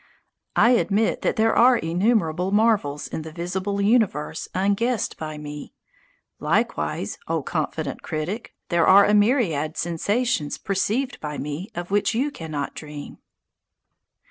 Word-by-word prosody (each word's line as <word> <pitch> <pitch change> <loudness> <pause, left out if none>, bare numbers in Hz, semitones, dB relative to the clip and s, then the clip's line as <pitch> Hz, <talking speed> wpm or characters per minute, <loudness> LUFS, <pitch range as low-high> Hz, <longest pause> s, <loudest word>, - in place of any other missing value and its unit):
I 240 - +5
admit 220 -3 +2
that - - 0
there 225 +1 +2
are 250 +1 +6
innumerable 180 -1 +1
marvels 205 -10 +2
in - - -5
the 160 0 -8
visible 185 +4 -3
universe 200 - +1
unguessed 205 +5 0
by 155 -1 -6
me. 150 0 -8 0.6
Likewise, - - -1
O - - -1
confident - - -3
critic, 175 +10 -4
there 170 -2 +3
are 200 +1 +8
a 210 - +2
myriad 205 - +2
sensations 175 - -1
perceived 215 +7 -1
by 150 -1 -5
me 150 - -5
of 175 +2 -5
which 205 +2 +1
you 275 +5 0
do 165 -12 -8
not 145 -2 -3
dream. 150 -1 -9
190 Hz, 135 wpm, -24 LUFS, 155-220 Hz, 0.6 s, are